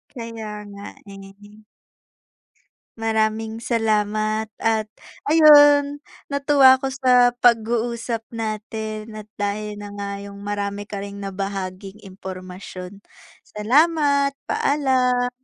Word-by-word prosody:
Kaya 230 -2 -7 0.2
nga 200 0 -10 0.3
eh. 195 +2 -14 1.4
Maraming 220 0 -1
salamat 215 -1 0
at 220 -1 0 0.4
ayun 290 -2 +6 0.3
natuwa 275 -2 +5
ako 270 - -1
sa 250 -2 +4
pag-uusap 235 -1 +1
natin 215 0 -5
at 215 0 -10
dahil 205 +1 -3
na 205 -1 -9
nga 200 0 -5
yung 200 0 -10
marami 205 0 -4
ka 205 - -5
ring 200 0 -9
nabahaging 195 0 -5
impormasyon, 185 0 -9 0.5
salamat. 280 +4 +2 0.2
Paalam. 255 -3 +1
220 Hz, 95 wpm, -22 LUFS, 205-250 Hz, 1.4 s, ayun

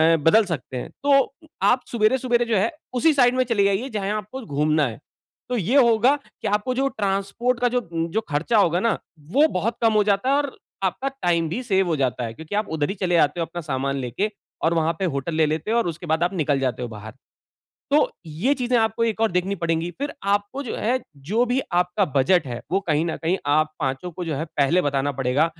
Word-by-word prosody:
अ, - - +1
बदल 210 +8 +5
सकते 140 -7 -4
हैं। 125 - -5
तो 275 -1 +4 0.4
आप 250 +1 +2
सुबेरे-सुबेरे 240 +1 +2
जो 230 -3 +1
है 205 +4 +1 0.2
उसी 310 +6 +3
साइड 250 -3 +4
में 255 - +3
चले 230 -5 +1
जाइये 200 +6 +1
जहाँ 205 -4 -3
आपको 215 +6 -7
घूमना 150 0 +1
है। 115 +1 -8 0.5
तो 250 - 0
ये 220 +5 0
होगा 240 +1 +5 0.3
कि - - -2
आपको 210 +5 0
जो 270 +2 +1
ट्रांसपोर्ट 205 +4 -1
का 245 - +3
जो, 250 +1 +1
उ, 165 -5 -3
जो 220 - 0
खर्चा 165 +10 +1
होगा 175 -4 +3
न, 230 - +2 0.3
वो 295 +7 +5
बहुत 225 - -2
कम 225 -1 +4
हो 210 -1 +4
जाता 205 +5 +1
है 275 - +4
और 285 -2 -2 0.3
आपका 190 +8 -1 0.2
टाइम 170 -2 +2
भी 205 +10 -3
सेव 195 -5 +2
हो 165 - +1
जाता 125 -2 0
है। 115 - -6
क्योंकि 160 - -7
आप 210 0 -1
उधर 145 -1 0
ही 195 - -3
चले 185 -3 0
जाते 165 +1 +3
हो 165 - 0
अपना 175 +2 -7
सामान 140 -3 -2
लेके 130 - -2 0.3
और 165 - +3
वहाँ 165 0 +1
पे 190 - 0
होटल 140 +4 -3
ले 160 0 +4
लेते 155 +7 -2
हो 235 - +3
और 235 - +1
उसके 170 +1 -5
बाद 160 +1 +1
आप 175 +3 0
निकल 150 -6 +1
जाते 130 -3 -1
हो 125 - -2
बाहर। 110 0 -9 0.8
तो 295 +2 +4 0.2
ये 160 - 0
चीज़ें 250 -2 0
आपको 225 +1 +1
एक 225 -1 -1
और 225 - +3
देखनी 180 +2 0
पड़ेंगी। 165 0 0
फ़िर 285 +1 -3 0.2
आपको 205 +7 -1
जो 245 - -5
है, 245 +4 +1 0.2
जो 195 - 0
भी 250 +2 +1
आपका 180 +3 +2
बजट 140 +5 +3
है, 120 -2 -5
वो 190 +3 +2
कहीं 160 -5 0
न 165 - -2
कहीं 175 +4 +1
आप 155 +2 +2
पाँचों 135 +6 -2
को 180 +2 -5
जो 160 -2 -2
है 155 - -2
पहले 160 +6 +3
बताना 145 -1 0
पड़ेगा। 135 +3 +1
190 Hz, 235 wpm, -23 LUFS, 155-230 Hz, 0.8 s, बदल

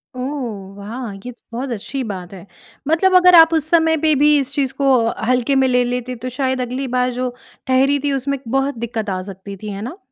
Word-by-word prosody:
ओह, 240 -8 -5
वाह! 220 +3 -6
ये 250 - -5
तो 240 - -21 0.2
बहुत 265 +1 -3
अच्छी 255 +5 -4
बात 180 0 -8
है। 185 0 -11 0.4
मतलब 370 +4 +3
अगर 360 -1 +7
आप 325 0 +8
उस 315 -1 0
समय 320 -1 +3
पे 310 0 +2
भी 300 0 +5
इस 275 0 -3
चीज़ 270 -2 0
को 275 - +2 0.4
हल्के 255 +2 +2
में 265 0 +4
ले 250 -1 +3
लेते, 250 +1 -3
तो 250 +2 -6
शायद 260 0 -1
अगली 255 +2 -3
बार 250 0 +1
जो 250 0 -2 0.4
ठहरी 270 +2 +3
थी 285 - +1
उसमें 275 0 -2
बहुत 270 +1 0
दिक्कत 225 -2 -4
आ 185 -1 -2
सकती 195 +1 -9
थी। 215 +2 -7
है 200 +1 -6
ना? 255 - -6
255 Hz, 220 wpm, -19 LUFS, 230-280 Hz, 0.4 s, आप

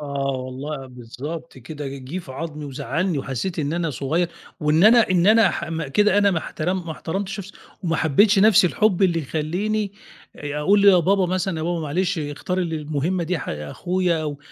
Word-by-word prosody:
آه 140 -2 -2
والله 135 +2 -5
بالضبط 130 +6 -8
كده، 145 +3 -7
جِه 135 +5 -6
في 145 -7 -9
عضمي 150 +1 -6
وزعّلني 145 +5 -2
وحسّيت 135 +8 -4
إن 150 0 -1
أنا 170 -2 -1
صغيّر 160 +6 -1 0.3
وإن 155 +5 +3
أنا 230 -2 +6
إن 180 -1 +3
أنا 220 +1 +6
ح - - -3
م 165 -3 -4
كده 205 +7 +3
أنا 200 -1 +4
ما 175 - +1
احترم 175 +3 -3
ما 160 - -3
احترمتش 195 +5 -4
نَفْسي 195 +2 -10 0.3
وما 165 -3 0
حبّيتش 195 +8 +4
نَفْس 210 -1 +6
الحُب 200 +1 +2
اللي 175 -3 +3
يخلّيني 190 +8 -2 0.4
آآ 145 0 -5
أقول 200 +6 +3
"يا 190 -3 +7
بابا 190 +2 +2
مثلًا، 185 -1 -1
يا 155 - -3
بابا 170 0 -1
معلش 175 +4 -1
اختار 145 +4 -3
ال 170 -3 -1
المهمّة 155 +4 -2
دي 180 +1 -1
ح - - -7
أخويا." 170 - -1
أو 145 -2 -4
165 Hz, 190 wpm, -22 LUFS, 145-185 Hz, 0.4 s, يا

